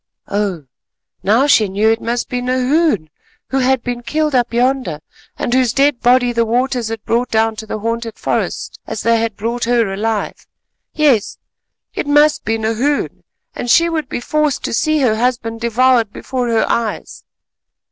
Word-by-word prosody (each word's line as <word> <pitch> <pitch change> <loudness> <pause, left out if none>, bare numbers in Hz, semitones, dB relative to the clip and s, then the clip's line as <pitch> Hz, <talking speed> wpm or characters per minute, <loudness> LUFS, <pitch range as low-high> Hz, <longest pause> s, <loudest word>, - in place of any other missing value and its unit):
Oh! 200 -7 -2 0.6
now 225 +7 +3
she 255 -7 +4
knew; 205 +3 +1
it 225 - -1
must 235 +1 -2
be 250 0 -3
Nahoon, 255 - +1 0.4
who 270 - +1
had 260 -1 +1
been 245 -1 -4
killed 300 +5 -1
up 245 -2 +1
yonder, 245 - 0 0.4
and 240 - -2
whose 255 -3 +2
dead 275 -2 +2
body 245 0 +3
the 230 0 +2
waters 245 +1 0
had 225 -1 -6
brought 240 +2 0
down 225 0 +1
to 220 - -7
the 215 - -3
haunted 230 +1 -3
forest - - -3
as - - -5
they 230 0 +3
had 225 -2 -2
brought 235 +3 -2
her 230 -4 +1
alive. 215 +1 -3 0.4
Yes, 280 -9 +2 0.6
it - - -3
must 295 +1 +4
be 225 0 0
Nahoon, 225 +6 -1 0.3
and 245 - -5
she 335 +7 +5
would 315 -5 -3
be - - -3
forced 300 +2 -1
to - - -3
see 310 +5 +1
her 225 -5 +2
husband 230 -1 -1
devoured 235 -1 +2
before 250 +1 -3
her 225 -1 +2
eyes. 230 -2 -3
240 Hz, 170 wpm, -17 LUFS, 225-260 Hz, 0.6 s, she